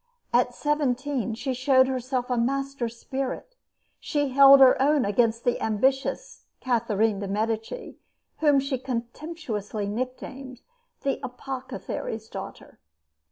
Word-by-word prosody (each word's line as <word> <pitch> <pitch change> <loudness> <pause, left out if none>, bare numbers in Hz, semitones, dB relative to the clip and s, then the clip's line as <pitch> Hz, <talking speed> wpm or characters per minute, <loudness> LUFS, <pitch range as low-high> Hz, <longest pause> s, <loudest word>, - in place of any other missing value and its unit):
At 245 0 +2
seventeen 275 -5 -1
she 260 +3 -3
showed 260 +1 +4
herself 255 -1 -2
a - - +2
master 270 +1 -1
spirit. 265 - -5 0.4
She 290 -2 -1
held 275 +1 +8
her 265 -1 +7
own 290 0 +3
against 230 +3 +1
the 245 - 0
ambitious 265 - -1
Catherine 225 -4 +1
de' 200 - -4
Medici, 220 - -3 0.4
whom 295 -3 +4
she 270 -1 -2
contemptuously 240 - -4
nicknamed 255 +3 -5 0.4
"the 275 -1 0
apothecary's 250 -3 -6
daughter." - - -9
255 Hz, 115 wpm, -26 LUFS, 230-275 Hz, 0.4 s, held